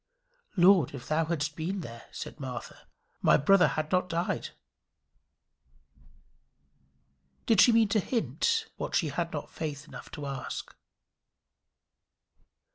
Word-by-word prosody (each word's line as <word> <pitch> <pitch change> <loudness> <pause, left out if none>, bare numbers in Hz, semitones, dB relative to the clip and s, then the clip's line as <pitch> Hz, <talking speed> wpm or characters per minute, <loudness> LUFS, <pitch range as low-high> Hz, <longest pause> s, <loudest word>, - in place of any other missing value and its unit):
"Lord, 175 -6 +5
if 125 -2 -9
thou 160 +1 +1
hadst 150 -3 -2
been 180 +3 -3
here," 115 -3 -9
said - - -7
Martha, 130 -3 -7 0.3
"my - - +5
brother 190 +6 +5
had 155 0 -3
not 180 -1 +1
died." 170 +1 -1 3.0
Did 220 -4 +5
she 245 - +7
mean 225 -2 +4
to 215 - +3
hint 450 - 0
what - - -3
she 160 - +2
had 170 +4 -2
not 145 - -5
faith 150 -1 -5
enough - - -10
to 150 - -6
ask? 135 -1 -5
165 Hz, 120 wpm, -29 LUFS, 145-195 Hz, 3.0 s, she